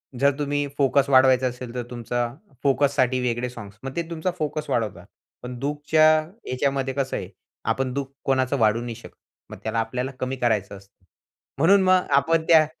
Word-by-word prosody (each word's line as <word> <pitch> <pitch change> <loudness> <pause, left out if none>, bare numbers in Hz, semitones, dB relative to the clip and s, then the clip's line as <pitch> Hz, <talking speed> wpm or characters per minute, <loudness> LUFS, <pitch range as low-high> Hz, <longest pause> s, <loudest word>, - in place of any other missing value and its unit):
जर 140 +3 +3
तुम्ही 145 0 -1
फोकस 140 0 +3
वाढवायचा 130 -1 +5
असेल, 125 -1 -6
तर 125 - -2
तुमचा 120 0 -3 0.3
फोकससाठी 135 -2 +2
वेगळे 125 0 -1
सॉन्ग्स 105 -4 -11
मग 135 0 -6
ते 170 - 0
तुमचा 170 +2 -2
फोकस 155 -1 -3
वाढवतात. 100 -7 -2 0.4
पण 125 0 -6
दुःखच्या 150 +3 +2 0.4
ह्याच्यामध्ये 135 +1 -1
कसं 135 0 -2
आहे, - - -6 0.4
आपण 125 +3 0
दुःख 140 0 -2 0.2
कोणाचं 130 0 +1
वाढवू 110 +1 +3
नाही 120 -1 -5
शकत. 115 - -13 0.3
मग - - -9
त्याला 110 +1 -1
आपल्याला 125 +4 -2
कमी 130 +1 -2
करायचं 110 -6 -1
असतं. 95 -1 -21 0.5
म्हणून 190 +8 +5
मग 185 -1 +3
आपण 165 0 +2
त्या 160 -2 +7
130 Hz, 170 wpm, -24 LUFS, 120-140 Hz, 0.5 s, त्या